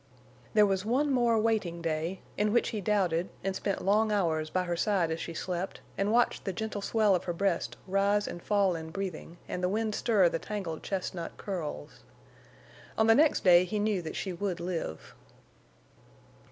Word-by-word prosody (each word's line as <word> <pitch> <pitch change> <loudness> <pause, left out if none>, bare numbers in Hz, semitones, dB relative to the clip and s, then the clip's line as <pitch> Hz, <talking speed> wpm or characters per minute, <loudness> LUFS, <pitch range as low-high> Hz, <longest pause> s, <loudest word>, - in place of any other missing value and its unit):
There 210 -1 +7
was 195 -2 0
one 265 +7 +1
more 240 -3 +3
waiting 215 -6 0
day, 165 +2 -2
in 210 0 +1
which 240 - +2
he 215 - -3
doubted, 185 -4 +1
and 195 -1 -1
spent 195 0 -2
long 215 +2 +3
hours 160 -6 0
by 185 +2 0
her 175 -1 -2
side 175 -2 +1
as 160 - -2
she 165 - -6
slept, 180 +2 -3 0.2
and 200 +1 0
watched 240 +1 +2
the 195 - -3
gentle 215 +1 -4
swell 215 -1 +2
of 180 - 0
her 175 - -1
breast 190 0 -1
rise 200 +2 +1
and 175 - -6
fall 200 -3 +2
in 160 -1 -6
breathing, 175 -2 -5
and 180 - -4
the 180 - +1
wind 215 +2 -1
stir 210 -5 +3
the 165 - -1
tangled 190 -7 -5
chestnut 185 -3 -4
curls. 160 - -5 1.0
On 220 - +4
the 225 - +7
next 300 +5 +3
day 175 -1 +7
he 195 +4 -3
knew 205 -2 +1
that 160 - -6
she 190 - -3
would 180 0 -3
live. 170 - -4
195 Hz, 185 wpm, -30 LUFS, 175-210 Hz, 1.0 s, There